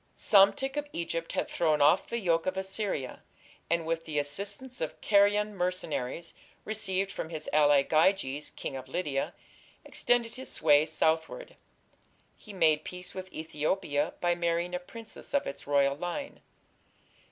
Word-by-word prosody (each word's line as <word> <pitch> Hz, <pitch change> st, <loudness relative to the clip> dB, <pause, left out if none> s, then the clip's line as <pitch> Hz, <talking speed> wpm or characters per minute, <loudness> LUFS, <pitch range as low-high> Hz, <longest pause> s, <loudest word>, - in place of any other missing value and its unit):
Psamtik 265 Hz, +8 st, +4 dB
of 295 Hz, 0 st, -2 dB
Egypt 165 Hz, 0 st, -3 dB
had -, -, -1 dB
thrown 155 Hz, -3 st, +1 dB
off 145 Hz, +6 st, +4 dB
the 235 Hz, -, -2 dB
yoke 170 Hz, -5 st, +1 dB
of 185 Hz, 0 st, -1 dB
Assyria, 190 Hz, -, -3 dB, 0.5 s
and 170 Hz, 0 st, +1 dB
with 165 Hz, 0 st, -2 dB
the 155 Hz, -2 st, -4 dB
assistance 200 Hz, -, -1 dB
of 160 Hz, -, -4 dB
Carian 205 Hz, +1 st, +3 dB
mercenaries 170 Hz, -4 st, -3 dB, 0.3 s
received 195 Hz, -3 st, -1 dB
from 160 Hz, -, -5 dB
his 155 Hz, -2 st, -6 dB
ally, 145 Hz, -2 st, +5 dB
Gyges, 155 Hz, -3 st, +1 dB
king 135 Hz, -, -6 dB
of 130 Hz, 0 st, -7 dB
Lydia, 135 Hz, -1 st, -2 dB, 0.5 s
extended 240 Hz, -2 st, +1 dB
his 260 Hz, 0 st, -7 dB
sway 150 Hz, 0 st, +4 dB
southward. 160 Hz, -, -1 dB, 0.8 s
He 215 Hz, -, -13 dB
made 155 Hz, -5 st, +3 dB
peace 180 Hz, 0 st, -7 dB
with 185 Hz, 0 st, -7 dB
Ethiopia 155 Hz, -1 st, -1 dB
by 175 Hz, 0 st, +3 dB
marrying 170 Hz, 0 st, -1 dB
a 180 Hz, -, -1 dB
princess 225 Hz, +8 st, -8 dB
of 285 Hz, -, +2 dB
its 140 Hz, -, -7 dB
royal 140 Hz, -1 st, +3 dB
line. 175 Hz, -, -5 dB
175 Hz, 145 wpm, -29 LUFS, 155-200 Hz, 0.8 s, ally